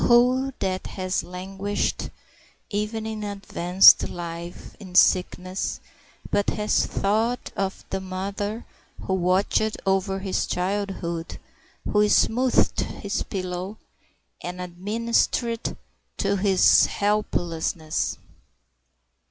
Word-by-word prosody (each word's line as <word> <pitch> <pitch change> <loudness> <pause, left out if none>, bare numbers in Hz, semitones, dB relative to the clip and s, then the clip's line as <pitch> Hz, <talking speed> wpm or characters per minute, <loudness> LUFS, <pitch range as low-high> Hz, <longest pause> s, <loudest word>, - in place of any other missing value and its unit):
Who 250 +3 +4
that 185 -1 -2
has 185 0 0
languished, 195 +3 -3 0.6
even 215 +2 -2
in 220 -1 -4
advanced 195 -2 +5
life, 170 0 -7
in 185 -3 -11
sickness, 185 0 +2 0.5
but 205 - +2
has 210 0 +1
thought 225 +5 0
of 195 -1 -3
the 195 - -1
mother 200 +4 -4 0.4
who 190 - -1
watched 190 +4 +1
over 195 0 +1
his 190 -1 -1
childhood, 180 -3 -3 0.5
who 210 0 +3
smoothed 250 +4 +3
his 200 0 -3
pillow, 185 +2 -4 0.6
and 180 +1 -6
administered 225 +6 -1 0.4
to 200 0 +1
his 195 -1 +5
helplessness? 175 -6 -1
195 Hz, 95 wpm, -24 LUFS, 185-210 Hz, 0.6 s, advanced